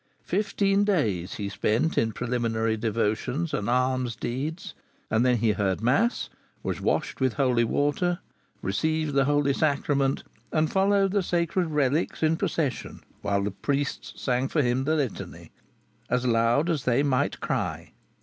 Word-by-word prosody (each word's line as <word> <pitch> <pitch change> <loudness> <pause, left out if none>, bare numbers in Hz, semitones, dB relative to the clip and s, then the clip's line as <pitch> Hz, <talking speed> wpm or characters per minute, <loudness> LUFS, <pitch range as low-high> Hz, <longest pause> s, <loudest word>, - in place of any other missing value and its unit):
Fifteen 200 +1 +1
days 105 - 0
he 100 - -3
spent 115 +9 0
in 115 - +2
preliminary 115 -1 -1
devotions 115 +8 -1
and 105 +1 -1
alms 125 -1 +1
deeds, 150 +8 -4 0.4
and 110 +2 +3
then 125 -1 +3
he 110 0 +2
heard 100 -3 0
mass, 135 - +1 0.4
was - - -3
washed - - -1
with 130 -3 +2
holy 125 -4 +2
water, 145 +8 +1 0.5
received 155 +9 0
the 135 0 +3
Holy 145 -1 +2
Sacrament, 140 -2 +1 0.3
and 155 -1 +1
followed 195 0 +3
the 200 0 +2
sacred 175 0 0
relics 150 +1 0
in 160 +1 +3
procession, 165 -6 -2 0.2
whilst 100 -1 0
the 105 - -1
priests 140 +7 -3
sang 130 0 0
for 150 +1 +1
him 125 +2 +1
the 155 +2 +2
Litany, 140 -8 -4 0.6
"as 125 0 +1
lowde 120 +7 +3
as 145 -5 -2
they 125 +3 +3
mygth 135 -3 +1
crye." - - -3
135 Hz, 150 wpm, -26 LUFS, 115-160 Hz, 0.6 s, and